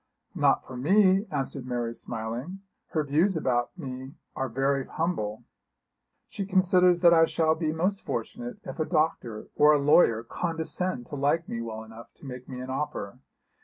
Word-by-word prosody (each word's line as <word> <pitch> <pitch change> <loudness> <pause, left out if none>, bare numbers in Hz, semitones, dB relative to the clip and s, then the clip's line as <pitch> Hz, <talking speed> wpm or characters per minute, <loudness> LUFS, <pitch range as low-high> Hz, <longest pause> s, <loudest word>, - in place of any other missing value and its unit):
'Not - - +2
for 130 - -9
me,' 190 - +4
answered 135 -3 -3
Mary 120 -2 -2
smiling. 120 +12 -5 0.3
'Her 155 - -1
views 160 +6 +2
about 125 +1 -1
me 130 -2 -7 0.2
are 135 0 -2
very 135 +2 0
humble. 135 -11 -2 0.8
She 200 - -5
considers 180 -2 +4
that 170 -1 +7
I 165 -1 +6
shall 160 -1 +2
be 160 -1 -1
most 185 +5 -1
fortunate 245 -2 -4
if - - -8
a 155 - +1
doctor 155 -10 -1
or 150 +1 +6
a 150 - +3
lawyer 140 -6 +4
condescend 165 0 -3
to - - -5
like 145 +4 +1
me 115 - -4
well 110 -1 -6
enough 110 +1 -13
to - - -15
make 125 -1 -8
me 130 -1 -6
an 130 +1 -6
offer. 130 -5 -4
145 Hz, 165 wpm, -27 LUFS, 125-175 Hz, 0.8 s, that